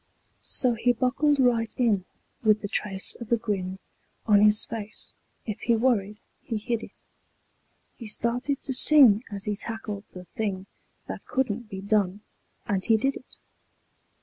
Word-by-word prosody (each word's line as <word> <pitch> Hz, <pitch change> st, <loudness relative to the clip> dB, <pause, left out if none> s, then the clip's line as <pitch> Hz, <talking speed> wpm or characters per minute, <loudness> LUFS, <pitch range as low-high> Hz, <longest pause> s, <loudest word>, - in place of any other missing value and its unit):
So 250 Hz, -2 st, +2 dB
he 240 Hz, +2 st, +1 dB
buckled 270 Hz, +4 st, +1 dB
right 235 Hz, -3 st, +2 dB
in 215 Hz, -7 st, +1 dB, 0.4 s
with 215 Hz, -1 st, +3 dB
the -, -, -2 dB
trace 195 Hz, -1 st, -1 dB
of 235 Hz, -, -8 dB
a 235 Hz, -, +4 dB
grin 190 Hz, -4 st, -3 dB, 0.5 s
On 205 Hz, -2 st, +5 dB
his 210 Hz, 0 st, +7 dB
face. 215 Hz, -2 st, -7 dB, 0.3 s
If 215 Hz, -3 st, -5 dB
he 235 Hz, -, +1 dB
worried 215 Hz, -4 st, +1 dB, 0.2 s
he 225 Hz, -, -4 dB
hid 230 Hz, +1 st, -2 dB
it. -, -, -12 dB, 0.9 s
He 230 Hz, -, -8 dB
started 245 Hz, +6 st, 0 dB
to 265 Hz, -, -2 dB
sing 255 Hz, -5 st, +6 dB
as 200 Hz, -2 st, -6 dB
he 210 Hz, -, -1 dB
tackled 215 Hz, -1 st, -6 dB
the 180 Hz, -, -9 dB
thing 195 Hz, -2 st, -4 dB, 0.4 s
That -, -, -8 dB
couldn't 240 Hz, -3 st, -2 dB
be 190 Hz, -2 st, -7 dB
done, 200 Hz, -1 st, 0 dB, 0.4 s
and 195 Hz, -2 st, -1 dB
he 225 Hz, +2 st, +3 dB
did 270 Hz, +5 st, 0 dB
it. -, -, -12 dB
220 Hz, 155 wpm, -26 LUFS, 205-240 Hz, 0.9 s, his